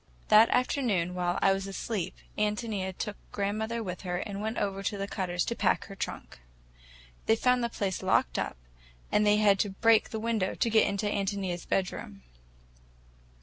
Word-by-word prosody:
That 220 +2 +7
afternoon, 230 - +1
while 180 0 -1
I 195 - +5
was 195 0 -3
asleep, 195 -1 -3 0.2
Ántonia 210 -3 -2
took 210 -2 -4
grandmother 220 +3 -2
with 180 -3 -5
her, 180 -2 -2
and 200 +2 -4
went 220 +2 -3
over 195 -1 -1
to 205 +1 -2
the 200 0 -3
Cutters' 180 -3 -1
to 235 - -2
pack - - +1
her 195 - -10
trunk. - - -6 0.9
They 225 - +5
found 250 +1 +2
the 235 - 0
place 195 -5 -2
locked - - +2
up, - - -3 0.5
and 210 0 +3
they 210 0 +5
had 205 -2 +4
to 205 - +1
break 225 +3 +3
the 220 - -4
window 220 -4 -1
to 230 - +1
get 220 0 +5
into 200 +1 -2
Ántonia's 195 -3 -2
bedroom. 100 - -2
200 Hz, 175 wpm, -29 LUFS, 190-220 Hz, 0.9 s, That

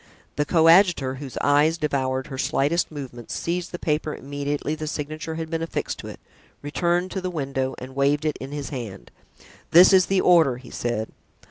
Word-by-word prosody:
The 150 - 0
coadjutor, 165 -5 +4
whose 135 -3 -7
eyes 145 +3 +3
devoured 130 -4 -1
her 130 - -7
slightest 155 +8 +1
movements, 130 -6 -7
seized 175 +1 -3
the 175 - -5
paper 155 -2 -1
immediately 145 +2 -3
the 155 0 -5
signature 155 +1 -4
had 160 0 -5
been 165 0 -1
affixed 165 - -3
to - - -8
it, - - -9 0.4
returned 175 +5 0
to 190 - -3
the 185 - -2
window 135 -5 -2
and 130 +1 -9
waved 140 +2 +1
it 155 - 0
in 135 +1 -8
his 145 -1 -5
hand. 115 -9 -7 0.6
"This 180 +3 +8
is 185 -1 +5
the 195 -1 +2
order," 165 -10 +4
he 125 -1 -13
said. 120 -2 -2
150 Hz, 185 wpm, -24 LUFS, 135-165 Hz, 0.6 s, This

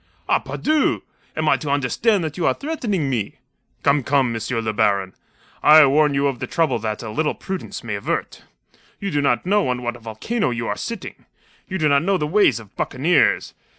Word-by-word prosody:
"Ah, - - +3
pardieu! 310 -1 0 0.3
Am 155 0 -1
I - - +4
to 150 - -5
understand 155 - +1
that 155 -2 -4
you 175 - 0
are - - +2
threatening 230 - -2
me?" 115 -7 -2 0.5
"Come, 140 +1 +3
come, 130 -2 +1
M. 115 - -4 0.2
le 110 -1 -2
Baron! 100 -2 +1 0.5
I 155 0 +8
warn 145 +1 +3
you 140 +1 +1
of 135 -3 -1
the - - -4
trouble 160 -8 +1
that 110 +1 -4
a 110 - -6
little 150 +8 -1
prudence 190 -7 -6
may 115 -3 -4
avert. 100 - -3 0.6
You 200 -1 -3
do 145 - +1
not 125 -3 +1
know 205 -1 +2
on 125 -1 -2
what 120 0 -2
a - - -12
volcano 115 - -2
you 115 -1 -3
are 105 - -2
sitting. 230 - -7 0.4
You 190 - -2
do 155 -4 +2
not 140 -1 +4
know 190 +3 +1
the 150 - -1
ways 195 - +3
of 110 -2 -15
buccaneers. 155 +7 +1
140 Hz, 205 wpm, -21 LUFS, 120-180 Hz, 0.6 s, I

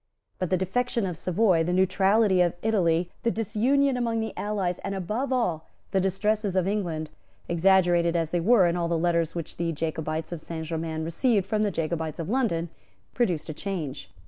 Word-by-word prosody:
But 185 - -1
the 185 - +2
defection 230 +4 -1
of 180 -3 -3
Savoy, 180 0 +2
the 175 +2 -1
neutrality 190 +1 +3
of 175 -1 +2
Italy, 175 -6 +1
the 235 - +1
disunion 245 +6 +1
among 230 -2 0
the 220 -1 -3
allies, 195 -4 -2
and, 195 0 -4
above 215 +9 -2
all, 180 -11 0 0.2
the 190 - +2
distresses 205 +1 0
of 185 -1 +2
England, 170 -7 -2 0.4
exaggerated 175 -1 +3
as 165 -2 0
they 175 - +1
were 200 +2 +5
in 170 0 +1
all 170 -1 0
the 170 0 0
letters 170 -1 +1
which 170 -3 -5
the 170 0 -1
Jacobites 160 0 -3
of 170 -3 -5
Saint 160 0 -6
Germains 160 -1 -3
received 200 +4 +1
from 215 +1 0
the 210 - +2
Jacobites 160 -3 -3
of 165 0 -4
London, 205 -10 0 0.4
produced 185 -11 0
a - - -3
change. 155 -6 -5
180 Hz, 185 wpm, -26 LUFS, 165-210 Hz, 0.4 s, were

